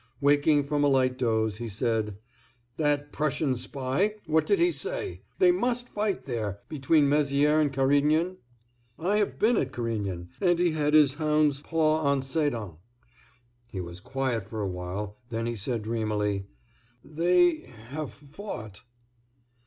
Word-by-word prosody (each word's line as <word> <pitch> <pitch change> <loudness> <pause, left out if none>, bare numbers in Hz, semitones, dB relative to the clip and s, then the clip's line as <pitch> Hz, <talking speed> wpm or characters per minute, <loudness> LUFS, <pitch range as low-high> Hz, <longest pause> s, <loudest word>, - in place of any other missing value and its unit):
Waking 145 +1 +4
from 145 +1 0
a - - +5
light 130 -2 +3
doze, 110 -4 0
he 115 0 -5
said: 110 -1 -1 0.6
"That 145 -1 0
Prussian 150 -2 0
spy, 135 - -1
what 160 0 +2
did 405 - +3
he 350 0 +3
say?—they 385 -5 0
must 245 -7 0
fight 210 -3 -2
there—between 130 - 0
Mézières 145 +1 +3
and 145 -2 +1
Carignan? 145 +6 +2 0.6
I 195 +5 +1
have 205 - -1
been 225 +1 +3
at 130 - 0
Carignan—and 115 - -1
he 175 -1 +2
had 150 -1 +1
his 145 -3 +6
hound's 150 -2 +1
paw 155 -1 +1
on 140 -2 +1
Sedan." 130 - -2 0.9
He 95 - -5
was 85 0 -6
quiet 125 -2 -2
for 110 -1 -5
a 100 - -1
while; 95 +3 -5
then 115 -1 -2
he 120 0 -2
said, 115 +1 -3
dreamily: 105 -3 -1 0.6
"They—have—fought." 150 - -2
140 Hz, 130 wpm, -27 LUFS, 115-155 Hz, 0.9 s, his